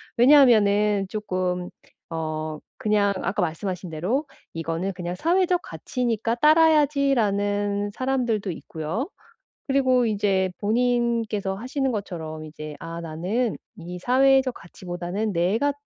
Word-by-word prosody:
왜냐하면은 210 -7 +5
쪼끔 185 -4 -2 0.4
어 155 -1 -3 0.2
그냥 205 -2 +2
아까 200 +2 -1
말씀하신 180 +1 -3
대로 190 - -1 0.3
"이거는 165 +3 -2
그냥 175 0 -5
사회적 355 - +2
가치니까 235 -2 -2
따라야지."라는 245 -10 +3
사람들도 240 -7 -1
있고요. 165 - -4 0.6
그리고 260 -3 +3
이제 200 -3 +1
본인께서 230 -3 0
하시는 260 +5 -2
것처럼 160 -7 -5
이제 155 -1 -8
'아. 165 0 -6
나는 185 +9 -2 0.2
이 180 +1 -7
사회적 265 +4 +4
가치보다는 180 +4 -5
내가 210 +12 +1
205 Hz, 280 characters per minute, -24 LUFS, 180-250 Hz, 0.6 s, 왜냐하면은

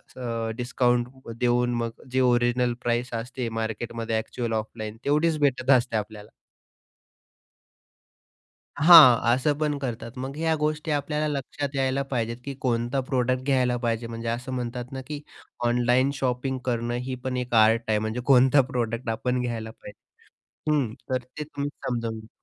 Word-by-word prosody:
अ, 115 -3 -3
discount 125 0 +1 0.3
देऊन 120 0 +2
मग 115 0 -5
जे 130 0 +2
ओरिजिनल 120 0 +2
प्राईज 120 +1 0
असते 125 -1 -5
मार्केटमध्ये, 115 0 -3
एक्चुअल 115 0 -4
ऑफलाईन, 110 0 -4
तेवढीच 155 +2 +2
भेटत 135 -2 +1
असते 125 -3 +3
आपल्याला. 105 0 -6 2.5
हां, 145 -7 +8
असं 140 +3 +1
पण 150 -2 0
करतात. 120 -2 -5
मग 135 +2 -5
ह्या 160 0 +1
गोष्टी 155 +1 -2
आपल्याला 150 +1 -1
लक्षात 145 0 -3
यायला 135 0 +1
पाहिजेत, 115 -2 -1
की 140 -1 -5
कोणता 120 +2 0
प्रॉडक्ट 130 -1 0
घ्यायला 130 -3 +2
पाहिजे. 115 -1 -2
म्हणजे 115 0 -5
असं 125 +3 -3
म्हणतात 125 +1 -4
ना, 130 - -4
की 150 -1 -5 0.5
ऑनलाईन 125 +3 +3
शॉपिंग 130 0 -1
करणं 120 -1 -1
ही 130 - -2
पण 130 -1 -2
एक 125 -1 -3
आर्ट 110 +1 +5
आहे. 105 -1 +2
म्हणजे 110 +3 -3
कोणता 135 +1 +6
प्रॉडक्ट 115 -1 -2
आपण 125 +3 -1
घ्यायला 115 -2 -4
पाहिजे 105 -1 -13 0.7
हं, 130 -7 +1 0.2
तर 130 -1 -1
ते 130 +4 -8
तुम्ही 145 -1 -4 0.2
समजून 115 -3 -2
घ्या. 110 - -14
125 Hz, 150 wpm, -25 LUFS, 115-135 Hz, 2.5 s, हां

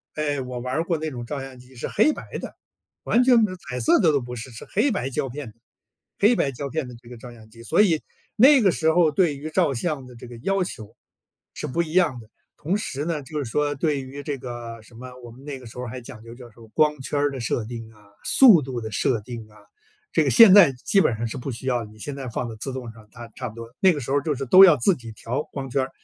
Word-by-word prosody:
哎， 145 -3 -1
我 125 -1 -6
玩 125 +1 -4
儿 160 - +1
过 170 -2 -1
那 155 0 -4
种 120 -3 -7
照 145 +2 -5
相 135 -1 -9
机 125 +1 -17
是 120 - -5
黑 225 +9 +3
白 - - -8
的， - - -7 0.5
完 245 - +3
全 245 -2 +5
没 215 -3 +2
有 - - -6
彩 125 0 -3
色 115 - +4
的 160 -4 +4
都 140 - +2
不 125 0 -7
是， 120 +2 -8
是 115 - -10
黑 235 +7 +1
白 135 -10 -2
胶 135 0 -2
片 140 0 -7
的， 110 - -13 0.6
黑 220 +4 +5
白 140 - 0
胶 140 +2 -6
片 155 -1 -3
的 - - -10
这 120 - -19
个 120 -1 -10
照 120 +1 -11
相 110 -1 -16
机。 115 +1 -14
所 170 - +3
以， 165 -7 +2 0.3
那 265 +3 +7
个 195 -4 +4
时 160 0 +2
候 170 -1 +4
儿 - - 0
对 155 -5 +2
于 155 +3 -6
照 155 -4 +1
相 140 0 -3
的 125 -1 -13
这 120 - -11
个 120 - -10
要 195 -2 +1
求， 110 - -8 0.6
是 - - -6
不 170 +6 -1
一 160 -1 -5
样 170 -9 +2
的。 110 -1 -15 0.3
同 180 +7 -1
时 145 -7 -4
呢， 155 -4 -3
就 150 +1 -5
是 120 - -5
说 145 +3 0
对 145 -1 -1
于 135 +2 -8
这 145 -2 -4
个 120 -2 -8
什 110 - -19
么， 130 +2 -9 0.2
我 120 - -10
们 130 +4 -15
那 140 -2 -5
个 125 - -14
时 115 - -12
候 125 - -4
儿 - - -6
还 130 +1 -7
讲 115 -1 -11
究 115 +1 -11
就 125 -1 -12
是 105 - -26
说， 115 -1 -15
光 150 +2 +1
圈 145 +2 -3
儿 145 0 +1
的 135 - -6
设 115 0 -2
定 115 0 -8
啊， 105 -1 -21 0.2
速 225 - +7
度 130 -3 -5
的 110 -1 -6
设 110 +2 0
定 115 -1 -8
啊， 105 - -21 0.6
这 - - +2
个 - - +2
现 225 -6 +8
在 195 -8 +9
基 160 +10 +1
本 130 -10 +2
上 115 +2 -4
是 115 - -5
不 130 +2 -6
需 120 +3 -7
要， 120 -3 0
你 105 0 -16
现 140 +6 -5
在 135 -2 -7
放 120 +1 -4
到 110 - -8
自 135 +4 -4
动 125 -3 -6
上， 110 -2 -17
它 120 -1 -10
差 125 - -4
不 110 - -10
多 115 +1 -10
那 190 -2 +5
个 145 - -5
时 130 - -5
候 140 - +3
儿 - - +1
就 150 -3 -1
是 135 - -4
都 190 +9 +9
要 170 -5 +6
自 160 +10 +3
己 115 -7 -9
调 125 +6 -3
光 135 -2 -5
圈 135 +2 0
儿， 135 - -5
135 Hz, 315 characters per minute, -23 LUFS, 120-155 Hz, 0.6 s, 在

